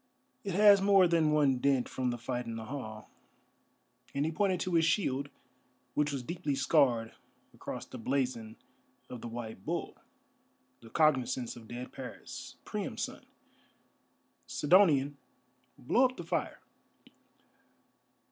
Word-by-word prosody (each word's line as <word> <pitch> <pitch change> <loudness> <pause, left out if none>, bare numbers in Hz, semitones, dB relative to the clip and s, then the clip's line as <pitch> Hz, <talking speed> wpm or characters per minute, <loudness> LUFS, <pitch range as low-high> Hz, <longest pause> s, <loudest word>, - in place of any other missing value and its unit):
"It 195 -3 -3
has 205 -1 +7
more 195 -2 +6
than 165 -3 +3
one 140 -4 +3
dint 135 -2 +2
from 130 -1 -2
the 120 - -2
fight 120 0 -4
in 115 - -4
the 110 0 -6
hall;" 110 -4 -7 1.0
and 140 +1 +1
he 160 - 0
pointed 185 +1 +1
to 185 - -2
his 165 -1 +4
shield, 145 -5 +1 0.6
which 150 +1 +1
was 135 -3 -3
deeply 150 -1 -2
scarred 130 -5 +2 0.4
across - - -7
the - - -9
blazon 125 -3 -2 0.6
of 125 -2 -7
the - - -6
White 115 -4 -7
Bull, - - -3 0.8
the 115 - -14
cognizance 130 -4 +1
of 115 -2 -12
dead 120 +2 -7
Paris, - - -8
Priam's - - -3
son. - - -7 1.2
"Sidonian, 145 -4 +4 0.6
blow 245 - +3
up 255 0 -1
the - - -5
fire." - - -3
140 Hz, 135 wpm, -31 LUFS, 120-165 Hz, 1.2 s, has